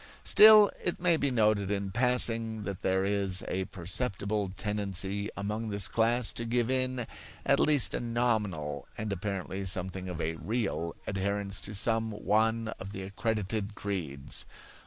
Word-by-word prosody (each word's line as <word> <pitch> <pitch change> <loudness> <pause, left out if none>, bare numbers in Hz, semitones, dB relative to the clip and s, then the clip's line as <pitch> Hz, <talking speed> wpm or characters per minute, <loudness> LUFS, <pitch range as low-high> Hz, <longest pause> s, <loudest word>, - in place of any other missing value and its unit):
Still, 215 -1 +8
it 175 - -2
may 175 -1 +3
be 145 -3 0
noted 105 -5 +2
in 100 -1 -2
passing 115 -2 +2
that 100 -2 -5
there 95 0 +1
is 100 -2 0
a 95 0 -2
perceptible 100 +2 -3
tendency 100 -1 -2
among 105 +3 -3
this 100 -2 +1
class 115 +1 +2
to 115 - -4
give 120 +1 0
in 130 -2 0 0.4
at - - +3
least 150 -4 +4
a - - -1
nominal, 105 -11 -1
and 105 -2 -3
apparently 95 0 -4
something 95 0 -2
of 90 -2 -5
a 80 0 -2
real, 95 -8 -2
adherence 100 0 -2
to 105 - -6
some 115 +2 +1
one 110 +2 +1
of 95 +1 -7
the 95 - -6
accredited 105 +1 -3
creeds. 80 -11 -4
105 Hz, 150 wpm, -30 LUFS, 95-115 Hz, 0.4 s, Still